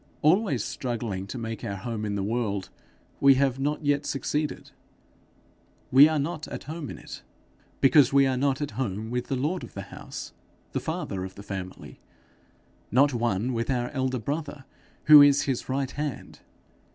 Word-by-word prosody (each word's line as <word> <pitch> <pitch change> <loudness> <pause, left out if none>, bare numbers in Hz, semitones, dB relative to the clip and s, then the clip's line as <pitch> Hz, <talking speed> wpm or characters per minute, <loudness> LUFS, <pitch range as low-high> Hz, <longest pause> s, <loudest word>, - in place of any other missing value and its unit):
Always 155 - +3
struggling 115 -6 -4
to 130 - -6
make 115 -2 -5
our 100 - -3
home 110 +2 -4
in 100 -1 -2
the 100 - -1
world, 105 -3 -2 0.5
we 140 -1 +6
have 135 -1 +1
not 150 +2 -2
yet 145 0 +2
succeeded. 150 +2 -2 1.2
We 140 +4 +8
are 155 - 0
not 150 +2 -3
at - - -7
home 155 0 -6
in - - -7
it, - - -10 0.6
because 140 +1 +6
we 140 0 +5
are 130 -1 +1
not 135 +1 0
at 145 - -3
home 110 -1 -3
with 125 0 -2
the 135 - -1
lord 150 +8 -1
of - - -11
the - - -5
house, - - -8 0.4
the - - -1
father 95 -1 -4
of 95 0 -8
the 100 - -10
family, 95 -2 -7 0.9
not 140 +4 +4
one 120 0 0
with 115 -1 -2
our 125 -2 0
elder 130 -2 -1
brother 145 +3 -4 0.4
who 150 -1 +10
is 145 0 +6
his 135 -2 -3
right 135 0 -1
hand. 150 -2 -5
130 Hz, 175 wpm, -26 LUFS, 115-145 Hz, 1.2 s, who